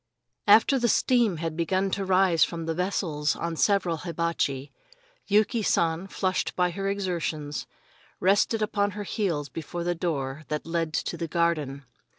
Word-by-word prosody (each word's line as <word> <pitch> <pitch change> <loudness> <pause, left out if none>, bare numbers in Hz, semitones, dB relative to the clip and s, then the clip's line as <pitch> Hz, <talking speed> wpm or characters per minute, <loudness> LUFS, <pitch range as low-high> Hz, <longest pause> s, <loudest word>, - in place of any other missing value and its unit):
After 225 +6 +6
the 240 - +2
steam 235 -6 +3
had 165 0 -3
begun 185 +3 0
to 200 - -1
rise 185 -3 +4
from 165 -1 -2
the 165 - -1
vessels 165 -4 -1
on 170 -1 -3
several 180 -2 +2
hibachi, 170 -5 -2 0.6
Yuki 215 +3 +3
San, 170 -2 +1
flushed 185 -1 -1
by 180 -1 +2
her 195 +3 -2
exertions, 170 -7 -3 0.5
rested 205 +3 +2
upon 205 -1 +1
her 205 - -3
heels 175 -9 -1
before 165 +3 -5
the 175 +1 0
door 150 -5 -3
that 150 0 -3
led 165 0 -1
into 155 - -3
the 165 - -3
garden. 155 -5 -1
170 Hz, 155 wpm, -26 LUFS, 160-195 Hz, 0.6 s, After